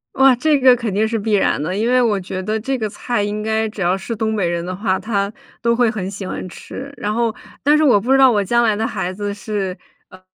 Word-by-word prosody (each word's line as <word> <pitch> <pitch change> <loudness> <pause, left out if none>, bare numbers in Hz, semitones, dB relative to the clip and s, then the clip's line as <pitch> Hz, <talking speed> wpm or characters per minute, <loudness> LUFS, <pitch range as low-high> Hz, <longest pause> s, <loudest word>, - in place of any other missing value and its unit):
哇， 265 -1 +6
这 295 +4 +2
个 255 -1 +7
肯 230 -4 -3
定 210 +3 +2
是 225 0 -1
必 215 +1 -1
然 195 -7 +2
的。 180 +5 -2
因 220 +4 0
为 255 0 +4
我 220 -4 +2
觉 185 0 -5
得 215 +3 -1
这 265 +5 -2
个 220 -3 -2
菜 240 +1 -2
应 210 +1 -2
该 220 0 0
只 215 -1 -8
要 180 +2 +2
是 230 +4 -5
东 220 0 -1
北 195 -5 0
人 170 0 -2
的 185 - -4
话， 190 -1 0
他 200 -3 -1 0.3
都 235 0 +2
会 240 -2 +3
很 195 -4 -4
喜 200 -1 -7
欢 185 - -5
吃。 265 +9 -9
然 210 -4 -3
后 230 0 0 0.3
但 295 +2 +5
是 310 - +2
我 245 -8 +5
不 250 +6 +1
知 - - +5
道 265 -1 +6
我 210 -3 +2
将 235 +5 +2
来 215 -3 +2
的 220 +1 0
孩 180 - -3
子 205 +1 -4
是， 200 -3 -4 0.3
呃， 185 0 -16
215 Hz, 290 characters per minute, -19 LUFS, 195-235 Hz, 0.3 s, 个